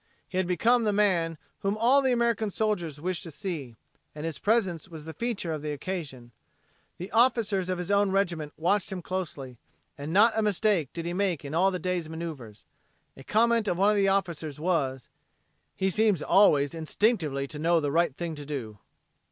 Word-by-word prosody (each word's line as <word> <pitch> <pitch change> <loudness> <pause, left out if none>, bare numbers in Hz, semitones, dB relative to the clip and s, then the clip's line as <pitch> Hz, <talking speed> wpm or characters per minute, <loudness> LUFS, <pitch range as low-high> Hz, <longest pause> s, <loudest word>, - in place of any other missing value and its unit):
He 185 - -5
had 185 - 0
become 230 +7 +3
the 215 - +2
man 180 -6 +2 0.2
whom 200 +2 -1
all 250 +5 +4
the 265 -1 +2
American 235 -3 +1
soldiers 180 -8 -2
wished 180 +2 -2
to 170 - -8
see, 150 - -6 0.4
and 150 +1 -6
his 160 -4 -4
presence 195 -6 0
was 160 -3 -9
the 160 - -7
feature 225 -8 -3
of 155 - -4
the 150 0 -3
occasion. 145 -7 -6 0.7
The 180 +3 -7
officers 225 -6 +2
of 185 - -1
his 180 +2 -4
own 200 0 +3
regiment 175 -6 -1
watched 185 +4 +1
him 185 -2 -5
closely, 145 -10 -5 0.4
and 145 +2 -5
not 215 +5 +5
a 220 - +2
mistake 205 - +1
did 165 -1 -6
he 175 - -2
make 180 -5 -1
in 140 - -6
all 185 +4 +4
the 185 - -2
day's 180 -3 -2
maneuvers. 155 -10 -7 0.5
A 135 - -12
comment 230 +4 +2
of 175 - 0
one 200 +3 +4
of - - +1
the 200 -1 +3
officers 170 -7 -1
was; 145 -7 -1 0.7
"He 190 0 0
seems 210 -4 +2
always 145 -8 +4
instinctively 160 - 0
to 150 +2 -8
know 170 +2 +3
the 145 -2 -1
right 165 -3 +2
thing 170 0 -4
to 145 -1 -8
do." 120 -8 -6
175 Hz, 195 wpm, -27 LUFS, 155-205 Hz, 0.7 s, not